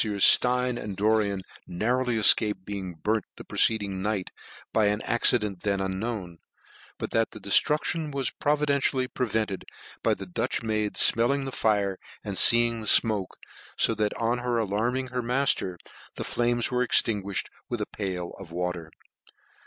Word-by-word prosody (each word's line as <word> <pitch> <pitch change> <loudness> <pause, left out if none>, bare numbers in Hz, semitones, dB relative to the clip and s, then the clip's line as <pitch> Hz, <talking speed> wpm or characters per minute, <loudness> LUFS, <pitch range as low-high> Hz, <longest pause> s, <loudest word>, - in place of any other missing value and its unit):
53 110 - 0
Meffieurs 100 - +2
Stein 125 0 +5
and 100 -3 -7
Doricn 105 -2 +1 0.3
narrowly 120 +6 -1
efcaped 105 -2 +4
be 100 - -5
ing 90 -2 -7
burnt 110 -1 0
the - - -9
preceding 100 -4 0
night, 100 -2 -3 0.4
by 110 -2 +3
an 105 0 0
accident 105 -5 +1
then 100 -1 -1
unknown; 95 -2 -4 0.6
but - - -5
that 115 0 +1
the 110 - -11
deftruclion 150 - +2
was 135 -2 -2
pro 150 +1 0
videntially 140 -3 0
prevented 110 -5 -2 0.4
by - - +2
a - - -2
Dutch 95 +3 -3
maid 110 -2 -1
fmclling 135 +4 +2
the 135 - -5
fire 100 -5 0 0.2
and 100 -2 -5
feeing 115 +2 +6
the 110 - -7
fmoke, 105 -5 +3 0.4
fo - - +4
that 105 -1 -2
on 115 +2 -1
her 120 -1 -1
alarming 115 +5 -1
her 125 0 -3
matter, 125 -7 -1 0.4
the - - -5
flames 120 0 -1
were 125 0 0
extinguished 105 -5 0 0.2
by - - -2
a - - -2
pail 90 -4 -5
of 95 -4 -11
water. 90 -1 -4
110 Hz, 160 wpm, -26 LUFS, 100-120 Hz, 0.6 s, feeing